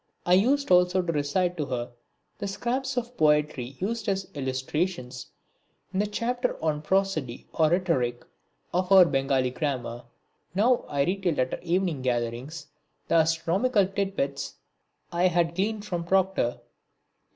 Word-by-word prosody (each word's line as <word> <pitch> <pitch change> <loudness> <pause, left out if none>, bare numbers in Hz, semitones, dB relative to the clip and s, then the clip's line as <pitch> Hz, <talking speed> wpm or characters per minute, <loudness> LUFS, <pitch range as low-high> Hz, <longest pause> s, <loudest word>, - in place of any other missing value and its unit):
I 175 - +3
used 255 +7 +3
also 180 +1 +4
to 170 - -1
recite 175 +4 0
to 150 -3 -2
her 120 -2 -3 0.5
the 200 - -3
scraps 255 +6 -2
of 245 0 -3
poetry 150 -4 +1
used 220 +2 -2
as 195 -1 -1
illustrations 130 0 -3 0.7
in 190 - 0
the 210 - +1
chapter 245 +4 -1
on 155 -2 -1
prosody 155 -7 -1
or 160 -2 +3
rhetoric 155 -9 0 0.5
of 180 +1 0
our 190 -2 +9
Bengali 135 -4 +1
grammar. 125 -4 -3 0.5
Now 235 +5 +3
I 140 -1 +1
retailed 180 -1 0
at 130 0 +1
her - - -3
evening 175 -4 0
gatherings 125 +5 -2 0.4
the - - +1
astronomical 170 +7 +2
tit 195 0 -2
bits 140 -3 -2 0.6
I 175 +1 +3
had 170 -1 +1
gleaned 205 +3 -1
from 175 -4 -3
Proctor. 190 -9 +1
175 Hz, 140 wpm, -27 LUFS, 140-195 Hz, 0.7 s, our